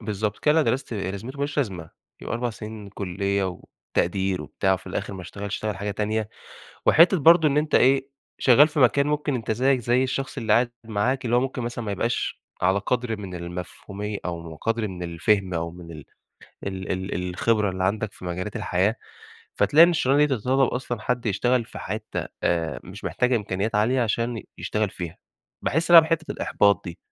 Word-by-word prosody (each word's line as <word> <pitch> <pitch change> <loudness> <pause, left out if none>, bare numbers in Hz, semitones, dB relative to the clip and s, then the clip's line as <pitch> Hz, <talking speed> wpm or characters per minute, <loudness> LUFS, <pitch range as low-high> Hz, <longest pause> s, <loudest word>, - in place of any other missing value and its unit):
بالضبط، 105 -1 -2
كل 150 - +2
اللي 160 +2 +5
أنا 155 - +2
درَستُه 130 -3 -3
إيه 95 -2 -2
لازمته؟ 115 +8 -7
ما - - -7
لوش 145 +1 -2
لازمة، 95 - -2 0.3
يبقى - - -3
4 120 +1 -1
سنين 105 -1 -8
كُليّة 100 0 -2 0.5
وتقدير 95 +1 +1
وبتاع 95 -1 0
وفي 95 0 -3
الآخر 95 +1 -4
ما 95 - -7
اشتغلش، 100 +2 -6
اشتغل 105 -2 -3
حاجة 100 +1 -3
تانية، 110 +1 -1 0.6
وحِتّة 170 +4 +6
برضه 160 +1 +6
إن 140 - -1
أنت 150 +1 +1
إيه، 135 +1 +4 0.3
شغّال 140 +4 +6
في 155 -1 -2
مكان 140 +3 +4
ممكن 150 -1 0
أنت 115 -3 -3
زيّك 130 +4 +2
زي 120 +2 +2
الشخص 135 +1 -3
اللي 110 -4 0
قاعد 120 +2 +4
معاك 115 +5 -1
اللي 120 0 +2
هو - - +4
ممكن 130 -1 -3
مثلًا 120 0 -4
ما 100 - -2
يبقاش 115 +5 -2 0.2
على 95 +2 +3
قدر 120 +2 -1
من 95 -3 -7
المفهومية 90 +4 -6
أو 85 -2 -5
قدر 115 +3 -1
من 90 -2 -7
الفهم 90 +3 0
أو 85 0 -2
من 85 -1 -11
ال 75 -3 -10 0.6
ال 95 -1 -3
ال 90 -1 -3
الخبرة 105 +2 +1
اللي 95 0 -2
عندك 105 +1 -1
في - - -13
مجالات 90 +3 -4
الحياة، 95 +6 +1 0.6
فتلاقي 160 +3 +6
إن 175 - +4
الشغلانة 145 -3 +3
دي 140 -3 +1
تتطلّب 130 +4 +2
أصلًا 125 -2 -3
حد 125 +2 -2
يشتغل 120 +4 +1
في - - -10
حِتّة 110 +2 -4 0.2
آآ، 85 -2 0
مش 95 +3 -11
محتاجة 125 0 +1
إمكانيات 105 0 -2
عالية 115 +5 +2
عشان 115 0 -1 0.2
يشتغل 105 -2 -1
فيها، 85 -2 -7 0.5
باحس 165 +3 0
هنا 170 -1 +11
بحِتّة 160 0 -1
الإحباط 100 -1 +2
دي. 85 -2 -7
110 Hz, 195 wpm, -24 LUFS, 95-125 Hz, 0.6 s, هنا